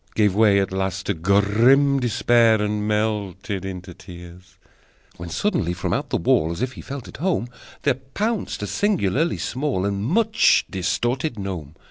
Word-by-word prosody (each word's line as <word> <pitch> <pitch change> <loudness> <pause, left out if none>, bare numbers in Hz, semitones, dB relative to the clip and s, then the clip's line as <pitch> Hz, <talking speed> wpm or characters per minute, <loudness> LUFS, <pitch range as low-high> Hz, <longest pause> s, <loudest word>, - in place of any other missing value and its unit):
Gave 105 -3 +3
way 105 -1 +4
at 95 - -1
last 95 0 -2
to 100 - 0
grim 105 - +3
despair, 120 -2 +3
And 105 0 -1
melted 105 -2 -2
into 95 -1 -7
tears: 90 0 -13 0.6
When 85 0 -7
suddenly, 115 - -1
from 90 - -3
out - - -2
the - - 0
wall, 80 +2 +2
As 85 +8 -3
if 130 - -2
he - - -10
felt 135 -2 -7
at - - -11
home, 160 -6 -1 0.3
There 140 - +3
pounced 160 - -3
a - - -1
singularly 165 - 0
small 130 -8 -2
And 100 0 -2
much 220 - +3
distorted 120 - -1
gnome. 90 -7 -6
105 Hz, 160 wpm, -22 LUFS, 95-130 Hz, 0.6 s, way